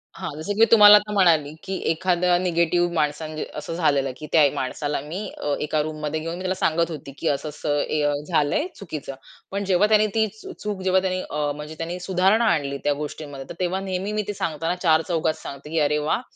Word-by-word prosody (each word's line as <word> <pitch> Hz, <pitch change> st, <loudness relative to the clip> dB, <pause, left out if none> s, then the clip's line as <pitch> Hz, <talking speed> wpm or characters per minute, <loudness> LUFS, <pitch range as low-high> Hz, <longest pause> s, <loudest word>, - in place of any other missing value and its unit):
हां, -, -, -5 dB
जसं 160 Hz, +6 st, -3 dB
की 205 Hz, -, -6 dB
मी 225 Hz, -, +8 dB
तुम्हाला 210 Hz, -2 st, +10 dB
आता 210 Hz, +1 st, -3 dB
म्हणाले, 160 Hz, -7 st, +3 dB
की 190 Hz, -, -4 dB, 0.2 s
एखादा 180 Hz, +1 st, +2 dB
निगेटिव्ह 175 Hz, -1 st, +1 dB
माणसा 150 Hz, -1 st, 0 dB, 0.3 s
असं 150 Hz, +2 st, -5 dB
झालेलं, 140 Hz, -5 st, +1 dB
की 150 Hz, -, -8 dB
त्या 160 Hz, -, +6 dB
माणसाला 145 Hz, +3 st, -2 dB
मी 160 Hz, +8 st, -6 dB, 0.2 s
अ, 145 Hz, -, -2 dB
एका 150 Hz, 0 st, 0 dB
रूममध्ये 155 Hz, 0 st, -3 dB
घेऊन 165 Hz, +1 st, -4 dB
मी -, -, -8 dB
त्याला 185 Hz, 0 st, -1 dB
सांगत 170 Hz, -2 st, +1 dB
होती, 145 Hz, -3 st, -7 dB
की -, -, -2 dB
असं-असं 145 Hz, 0 st, -1 dB
ए 155 Hz, -, -1 dB
अ, 145 Hz, -, +2 dB
झालंय 165 Hz, -, +1 dB
चुकीचं. 155 Hz, -7 st, -7 dB, 0.4 s
पण 200 Hz, +1 st, -2 dB
जेव्हा 190 Hz, +2 st, +3 dB
त्याने 215 Hz, 0 st, +4 dB
ती 220 Hz, -1 st, +3 dB
चू -, -, -8 dB
चूक 205 Hz, -2 st, -4 dB
जेव्हा 185 Hz, 0 st, +3 dB, 0.3 s
अ, 150 Hz, 0 st, -1 dB
म्हणजे 150 Hz, +1 st, -8 dB
त्यांनी 170 Hz, +2 st, -4 dB
सुधारणा 190 Hz, +5 st, +2 dB
आणली 140 Hz, -3 st, -2 dB
त्या 145 Hz, -, +2 dB
गोष्टींमध्ये 145 Hz, -2 st, -7 dB
तर -, -, -7 dB
तेव्हा 185 Hz, +1 st, 0 dB
नेहमी 190 Hz, +1 st, -3 dB
मी 215 Hz, 0 st, 0 dB
ते 205 Hz, -, -2 dB
सांगताना 165 Hz, -1 st, -2 dB
चार-चौघात 160 Hz, -1 st, +2 dB
सांगते, 140 Hz, +2 st, -8 dB
की 165 Hz, +1 st, 0 dB
अरे, 150 Hz, 0 st, +2 dB
वाह, 150 Hz, +9 st, 0 dB
165 Hz, 205 wpm, -23 LUFS, 150-185 Hz, 0.4 s, तुम्हाला